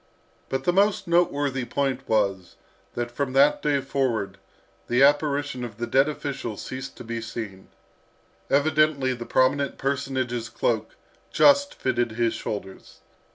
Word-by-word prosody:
But 135 0 -2
the 175 - +2
most 200 +1 +2
noteworthy 145 -6 +1
point 135 +1 -2
was, 100 -5 0 0.4
that 120 0 -3
from 130 +1 -3
that 140 +2 +4
day 145 -2 +1
forward 120 -8 -2 0.5
the 125 +3 +3
apparition 145 -2 +2
of 115 -3 -7
the 120 - -2
dead 135 +4 +3
official 135 -7 -5
ceased 130 +5 -7
to - - -8
be 115 0 -4
seen. 110 -4 -7 0.8
Evidently 145 -2 +2
the 120 -1 -7
prominent 140 +2 +1
personage's 130 -4 -2
cloak 110 -1 -1 0.4
just 285 0 +4
fitted 120 -3 -1
his 115 0 +1
shoulders. 95 -2 -7
130 Hz, 135 wpm, -25 LUFS, 115-140 Hz, 0.8 s, that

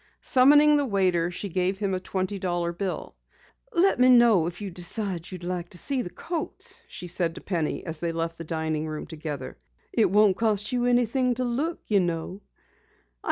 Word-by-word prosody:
Summoning 295 +3 +6
the 290 - +1
waiter, 185 -5 +1
she 180 +3 -4
gave 185 +1 0
him 195 -1 -1
a 185 - -1
twenty 190 +1 -3
dollar 175 -2 -1
bill. 185 +1 -4 0.6
"Let 385 - +3
me 250 +1 +6
know 235 -9 +6
if 175 0 -6
you 200 -2 -5
decide 180 0 -2
you - - -5
would 180 - -10
like 180 -1 -3
to 175 - -4
see 270 +6 -1
the 175 - -5
coats," 330 - -4
she - - -8
said 170 -1 -1
to - - -9
Penny 170 -5 -2
as 165 -2 -5
they 170 -1 -1
left 165 0 -3
the - - -5
dining 160 -1 -2
room 155 -1 -5
together. 150 - -7 0.3
"It 225 - +3
won't 205 0 +4
cost 215 -2 0
you 245 -1 0
anything 245 +1 +2
to 255 - -1
look, 275 +8 -2
you 205 -2 +3
know." 175 +2 -3
185 Hz, 195 wpm, -26 LUFS, 170-235 Hz, 0.6 s, Summoning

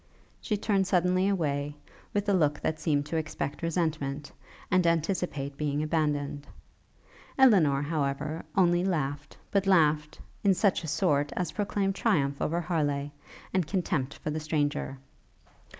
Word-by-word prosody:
She 210 - -1
turned 195 -2 +1
suddenly 180 +1 +2
away, 145 -6 -1 0.4
with 205 0 -1
a 200 - +3
look 150 -6 +2
that 155 0 -1
seemed 145 -3 +1
to 160 +2 -2
expect 155 -2 -3
resentment, 155 -4 -2 0.4
and 185 -1 +4
anticipate 165 -4 -1
being 150 0 -1
abandoned. 145 -2 -1 0.9
Elinor, 175 - +5
however, 150 +1 -2
only 175 -1 +4
laughed, 145 -6 -2
but 200 -1 +1
laughed 150 -4 +3 0.2
'in 195 -2 +4
such 195 -1 +2
a - - -5
sort' 145 -3 +1
as 180 - -2
proclaimed 200 -1 -1
triumph 145 -10 +1
over 170 +3 0
Harleigh, 145 -5 -1 0.4
and 185 -4 +1
contempt 165 -7 -1
for 155 - -4
the 155 - -2
stranger. 145 -3 -1
155 Hz, 135 wpm, -28 LUFS, 145-185 Hz, 0.9 s, Elinor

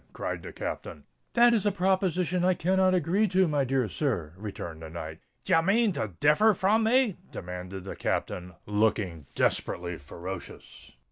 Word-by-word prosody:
cried - - -4
the - - -8
Captain. - - -6 0.3
"That 240 0 +6
is 220 - +2
a 205 - +2
proposition 185 -2 +1
I 185 0 +3
cannot 185 +2 +2
agree 185 +6 +2
to, 185 0 +3
my 145 -3 +1
dear 130 -2 +1
sir," 105 - -2
returned 90 -5 -7
the 80 - -8
knight. 80 -1 -7 0.2
"D' - - -4
ye 165 - +6
mane 210 +5 +3
to 110 - -3
differ 205 +9 +5
from 215 +5 +2
me?" 240 -3 +3
demanded 90 +1 -7
the 95 - -6
Captain, 90 -1 -3
looking 105 -7 0
desperately 85 -1 0
ferocious. 85 +6 -9
150 Hz, 160 wpm, -28 LUFS, -, 0.3 s, That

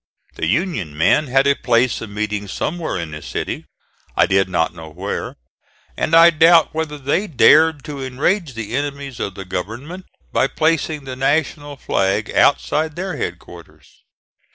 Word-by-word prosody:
The 80 - -3
Union 105 - -1
men 140 - +3
had 135 +2 +3
a 140 - +5
place 120 -2 +1
of 115 - -7
meeting 105 0 -3
somewhere 160 - -3
in 85 -3 -5
the 75 0 -7
city, - - -5 0.5
I - - +5
did 95 0 +2
not 85 -2 0
know 80 -3 -10
where, 75 - -5 0.6
and 165 - +1
I 165 +1 +8
doubt 165 0 +5
whether 155 -2 -3
they 145 +9 -1
dared 155 0 +5
to 145 -4 -6
enrage 140 - -1
the 115 +1 -5
enemies 140 -2 -4
of 100 - -4
the 95 - -7
government 120 - -6 0.2
by 135 - +2
placing 155 -1 0
the 130 -1 -6
national 145 +2 -1
flag 100 -1 -1
outside 155 +2 +2
their 185 -1 -4
head 85 -8 -3
quarters. 85 -1 -16
135 Hz, 160 wpm, -19 LUFS, 100-155 Hz, 0.6 s, I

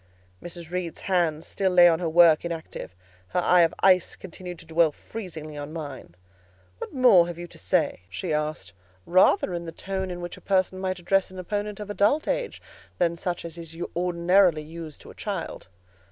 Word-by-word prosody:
Mrs. 170 -1 -9
Reed's 180 -2 -4
hands 170 -4 0
still 195 -1 0
lay 175 -1 +7
on 165 -1 +3
her 170 -2 -1
work 165 -1 +6
inactive: 165 - -6 0.3
her 180 - -1
eye 180 0 +5
of 165 - +4
ice 185 -2 +4
continued 180 -1 -9
to 165 - -13
dwell 160 0 +3
freezingly 160 -5 -8
on 145 +1 -6
mine. 145 - -8 0.6
"What - - -6
more 245 -10 +6
have 175 -1 -6
you 175 - -6
to 175 - -14
say?" 95 -1 0
she 160 - -3
asked, 150 - -3 0.3
rather 185 0 +4
in 170 0 -4
the 165 - -6
tone 190 +2 -4
in 175 -1 -5
which 175 0 -6
a - - -14
person 185 -1 +1
might 185 -1 -2
address 190 +2 +1
an 185 - -12
opponent 205 +3 -3
of 205 -1 -5
adult 210 +10 +2
age - - -2 0.3
than 170 -1 +1
such 175 0 -4
as 170 0 -7
is 165 -1 -10 0.2
ordinarily 175 -1 +3
used 160 -1 -9
to - - -12
a - - -13
child. 195 - -5
175 Hz, 190 wpm, -26 LUFS, 165-185 Hz, 0.6 s, lay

